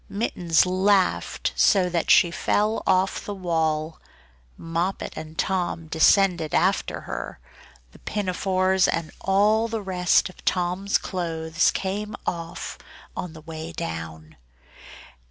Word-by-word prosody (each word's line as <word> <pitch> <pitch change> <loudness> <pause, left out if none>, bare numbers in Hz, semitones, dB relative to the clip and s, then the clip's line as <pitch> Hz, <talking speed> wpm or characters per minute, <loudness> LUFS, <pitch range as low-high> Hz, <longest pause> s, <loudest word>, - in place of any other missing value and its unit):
Mittens 180 -6 +1
laughed 190 +1 +1
so 190 -4 +4
that 175 -2 -1
she 170 - +6
fell 210 +5 0
off 190 0 +2
the 205 - -5
wall. 160 -3 -1 0.6
Moppet 170 +3 -3
and 155 0 -8
Tom 180 -3 -1
descended 170 0 +3
after - - +1
her; - - -6 0.5
the - - -17
pinafores 190 -1 +1
and 165 -2 -2
all 210 +4 +3
the 225 -2 -4
rest 180 -1 +2
of 185 - -15
Tom's 180 +2 +1
clothes 165 -2 -1
came 205 +2 -3
off 170 -1 -5 0.4
on 175 -3 -5
the 160 - -11
way 160 +1 -7
down. 80 - -6
180 Hz, 120 wpm, -24 LUFS, 165-195 Hz, 0.6 s, she